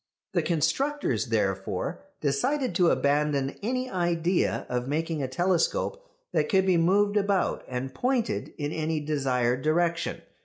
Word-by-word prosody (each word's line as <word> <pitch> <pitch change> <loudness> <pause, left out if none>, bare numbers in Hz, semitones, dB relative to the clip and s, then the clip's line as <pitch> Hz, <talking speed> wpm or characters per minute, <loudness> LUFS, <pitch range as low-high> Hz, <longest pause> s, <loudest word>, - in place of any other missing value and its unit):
The - - +2
constructors 180 - 0
therefore - - -1 0.2
decided 190 - 0
to 175 0 +4
abandon 140 -1 +1
any 255 +4 -1
idea 175 -3 0
of 125 0 -2
making 160 +1 -1
a 135 - -1
telescope 185 - 0 0.3
that - - +1
could 190 -2 +3
be 185 -2 +3
moved 200 +5 +3
about 200 -2 +1
and 130 +1 -4
pointed 250 - -1
in 145 -1 -2
any 160 0 -1
desired 130 -4 0
direction. 170 +3 0
165 Hz, 130 wpm, -27 LUFS, 145-200 Hz, 0.3 s, to